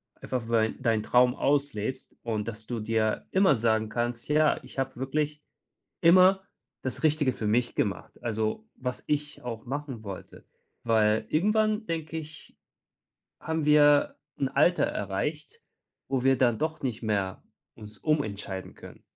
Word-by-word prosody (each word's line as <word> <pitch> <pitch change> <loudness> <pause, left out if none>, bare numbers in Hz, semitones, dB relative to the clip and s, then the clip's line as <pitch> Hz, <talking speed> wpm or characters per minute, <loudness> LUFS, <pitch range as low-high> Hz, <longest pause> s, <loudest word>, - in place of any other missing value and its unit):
einfach 120 -3 -4
weil 110 -1 +2
deinen 115 -4 0
Traum 125 +2 +4
auslebst 135 -3 -1
und 110 -2 -2
dass 110 -1 -6
du 120 -2 -3
dir 110 0 0
immer 190 -7 +4
sagen 110 -1 +1
kannst: 120 +1 -2
„Ja, 155 0 +3
ich - - -14
habe 135 -1 -2
wirklich 150 +3 -2 0.6
immer 185 +3 +6 0.4
das 130 - -3
Richtige 150 -4 +3
für 110 - -5
mich 120 +3 +1
gemacht!“ 100 - -3
Also 110 - -2
was 125 0 -4
ich 150 -2 -2
auch 115 -2 -6
machen 135 -3 -5
wollte, 100 -3 -9 0.4
weil 110 -1 +3
irgendwann 215 +5 +2
denke 160 -1 -3
ich, 155 0 -10 0.8
haben 160 -1 -2
wir 145 -1 +5 0.2
'n 135 - 0
Alter 155 +6 +3
erreicht, 465 0 -4 0.5
wo 135 -2 0
wir 135 -1 +5
dann 120 -4 +3
doch 155 0 -2
nicht 125 -5 -3
mehr 100 -4 -1 0.3
uns 105 -1 -12
umentscheiden 105 -11 -2
können. - - -13
130 Hz, 145 wpm, -28 LUFS, 110-150 Hz, 0.8 s, immer